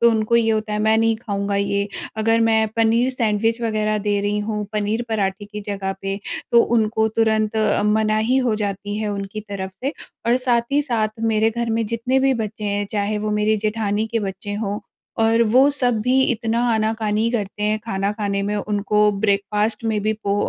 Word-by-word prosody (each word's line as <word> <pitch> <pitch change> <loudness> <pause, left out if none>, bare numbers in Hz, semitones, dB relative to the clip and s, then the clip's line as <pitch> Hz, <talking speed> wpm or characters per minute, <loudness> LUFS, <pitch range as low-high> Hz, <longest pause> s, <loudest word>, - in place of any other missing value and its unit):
तो 235 0 +6
उनको 220 +1 +2
ये 225 -1 +3
होता 215 -1 -1
है 210 - -1
मैं 220 +1 +3
नहीं 225 0 +2
खाऊँगा 200 -3 -2
ये। 200 0 0 0.3
अगर 225 +1 +2
मैं 220 0 +3
पनीर 230 +3 +3
सैंडविच 225 -1 0
वग़ैरह 215 -1 0
दे 205 -1 +2
रही 205 +1 0
हूँ, 210 0 -2
पनीर 215 +2 -1
पराठे 200 -2 -1
की 210 +1 -7
जगह 195 -1 -2
पे 195 0 -2 0.4
तो 235 - +7 0.2
उनको 220 0 +1
तुरंत 220 -1 +2 0.3
मनाही 215 +3 +2
हो 225 - +2
जाती 205 0 -3
है 215 -1 -2
उनकी 200 +1 -5
तरफ़ 190 -1 -5
से। 275 +4 -1 0.3
और 240 - +4
साथ 245 -1 0
ही 290 - +4
साथ 230 -6 0 0.2
मेरे 220 +1 +3
घर 235 0 -2
में 225 0 0
जितने 230 +4 0
भी 270 - +3
बच्चे 215 0 -7
हैं 205 0 -1
चाहे 210 0 -1
वो 215 0 -2
मेरे 215 +1 +2
जेठानी 215 0 -1
के 230 - +2
बच्चे 205 +2 -6
हों 205 -1 -2 0.4
और 225 +1 +4
वो 255 +5 +5
सब 245 -5 +1
भी 255 +4 +2
इतना 230 0 -1
आना-कानी 220 0 0
करते 210 -3 -3
हैं 210 +1 +1
खाना 195 -2 -1
खाने 200 -2 -2
में। 205 +1 -1
उनको 210 0 0 0.2
ब्रेकफास्ट 210 +2 0
में 220 -2 0
भी 215 - +1
पो 200 0 +1
215 Hz, 195 wpm, -21 LUFS, 205-225 Hz, 0.4 s, तो